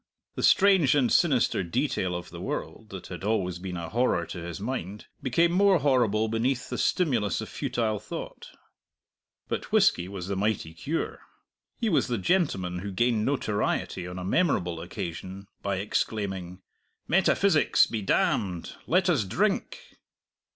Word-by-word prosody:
The - - -5
strange 190 -9 +5
and 130 -5 +2
sinister 140 - +3
detail 90 +1 -1
of 90 - -6
the - - -8
world, - - -5
that - - -8
had - - -7
always 95 -4 -1
been 90 -1 -5
a 85 -1 -5
horror 115 -7 +1
to 90 - -7
his 85 +1 -6
mind, 105 -3 -4 0.2
became 165 +7 +2
more 195 +1 +4
horrible 120 -7 +2
beneath 125 +4 -1
the - - -2
stimulus 120 - +1
of - - -6
futile 110 -3 -1
thought. 105 - -8 1.0
But - - -4
whisky 85 - +3
was 95 -2 -6
the 100 - -2
mighty 95 -5 -1
cure. 145 - -3 0.6
He 235 - -1
was 180 - +2
the 120 -2 -1
gentleman 95 - 0
who 100 +2 -5
gained 115 +2 +1
notoriety 105 -8 -1
on 90 0 -7
a 90 - -5
memorable 90 - +1
occasion 90 +3 -6 0.2
by 100 -1 -1
exclaiming, 95 -2 -3 0.4
"Metaphysics 190 -1 +4
be 110 - -4
damned; 95 -2 0
let 185 +2 +3
us 155 -11 +3
drink!" 215 - -2
105 Hz, 150 wpm, -27 LUFS, 90-140 Hz, 1.0 s, strange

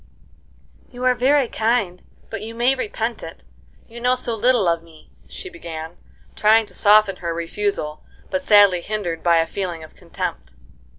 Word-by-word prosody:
"You 250 0 -9
are 255 0 +4
very 260 +2 +2
kind, 220 -6 -1 0.3
but 225 - -5
you 225 +1 -8
may 240 +3 +3
repent 230 -2 -3
it, - - -10 0.4
you 235 0 -11
know 250 +1 +3
so 250 -2 -1
little 230 -2 +2
of 170 -1 +1
me," 165 -2 -19 0.2
she - - -8
began, 165 - -8 0.4
trying 220 +1 +4
to - - -14
soften 205 -2 +4
her 170 -1 -4
refusal, 170 -3 -3 0.3
but 280 - -1
sadly 205 -8 +5
hindered 180 -5 -4
by 170 -1 +3
a 165 - +3
feeling 175 -3 -5
of 155 - -14
contempt. - - -6
210 Hz, 165 wpm, -21 LUFS, 170-240 Hz, 0.4 s, sadly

